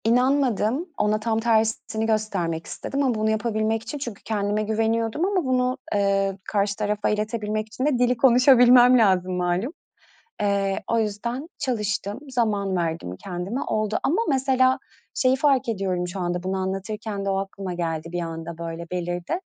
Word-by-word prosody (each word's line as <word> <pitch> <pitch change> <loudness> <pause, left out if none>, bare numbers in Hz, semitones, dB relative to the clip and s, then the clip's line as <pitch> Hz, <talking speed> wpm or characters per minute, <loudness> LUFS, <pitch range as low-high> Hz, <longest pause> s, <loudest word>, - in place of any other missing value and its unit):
İnanmadım. 250 - +2
Ona 210 +1 +1
tam 220 0 0
tersini 220 -1 +1
göstermek 195 -7 -1
istedim 280 +1 -3
ama 255 -4 +1
bunu 215 0 0
yapabilmek 220 0 0
için 295 - -5
çünkü 240 -7 -7
kendime 210 -1 -1
güveniyordum 225 - 0
ama 380 -5 0
bunu, 255 0 +1 0.2
eee, 195 -1 +1
karşı 200 -1 0
tarafa 210 -1 -1
iletebilmek 215 0 -2
için 245 +5 -4
de 285 -5 +2
dili 250 0 +2
konuşabilmem 250 0 +7
lazım 185 -5 +3
malum. 180 - -1 0.7
Eee, 200 -1 0
o 230 - +2
yüzden 235 +7 -3
çalıştım, 210 -4 -2
zaman 210 -6 0
verdim 165 - -2
kendime, 190 +7 -4
oldu 215 0 -1
ama 345 +10 +2
mesela 260 -1 +3 0.4
şeyi 255 0 +3
fark 270 -2 +2
ediyorum, 185 -4 -1
şu 180 +2 -6
anda 175 0 -2
bunu 190 +1 -1
anlatırken 200 +2 -4
de - - 0
o 195 - +1
aklıma 195 -1 -4
geldi 165 -2 -3
bir 175 0 -2
anda 165 0 -6
böyle, 170 0 -6
belirdi. 175 - -2
215 Hz, 155 wpm, -24 LUFS, 195-245 Hz, 0.7 s, konuşabilmem